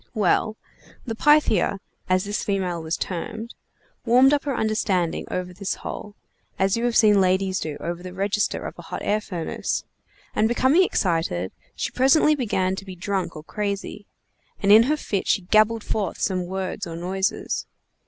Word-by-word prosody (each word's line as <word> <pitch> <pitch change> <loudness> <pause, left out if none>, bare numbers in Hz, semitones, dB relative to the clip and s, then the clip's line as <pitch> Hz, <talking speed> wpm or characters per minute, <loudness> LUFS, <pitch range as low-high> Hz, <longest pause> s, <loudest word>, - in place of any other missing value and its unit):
Well, 215 +1 +1 0.5
the 230 - -3
Pythia, 295 -6 +3 0.3
as 185 0 +3
this 205 0 -3
female 185 -4 -1
was 160 +1 -2
termed, 220 +6 -5 0.5
warmed 255 +4 +5
up 290 -1 +1
her 275 -3 -1
understanding 200 -6 0
over 180 0 -3
this 195 +1 -3
hole, 210 -1 -7 0.4
as 190 +1 +2
you 230 +1 -1
have 240 -1 +2
seen 210 -3 +6
ladies 190 +1 +1
do 155 -2 -4
over 170 +1 -4
the 185 0 -7
register 200 +2 -1
of - - -5
a - - -6
hot - - -6
air 210 +1 +1
furnace, 175 -5 -3 0.5
and 220 - +2
becoming 260 +8 +4
excited, 165 - 0 0.2
she - - -3
presently 275 +4 +4
began 200 -9 0
to - - -6
be 190 -2 -9
drunk 190 +1 -2
or 155 - -8
crazy, 205 +2 -4 0.5
and 200 - +3
in 215 +2 +10
her 305 - +2
fit 200 -9 -3
she 195 - +2
gabbled 215 +3 +3
forth 210 -3 -2
some 185 -2 -1
words 190 +1 -4
or 165 - -6
noises. 190 +3 -2
200 Hz, 170 wpm, -24 LUFS, 185-220 Hz, 0.5 s, in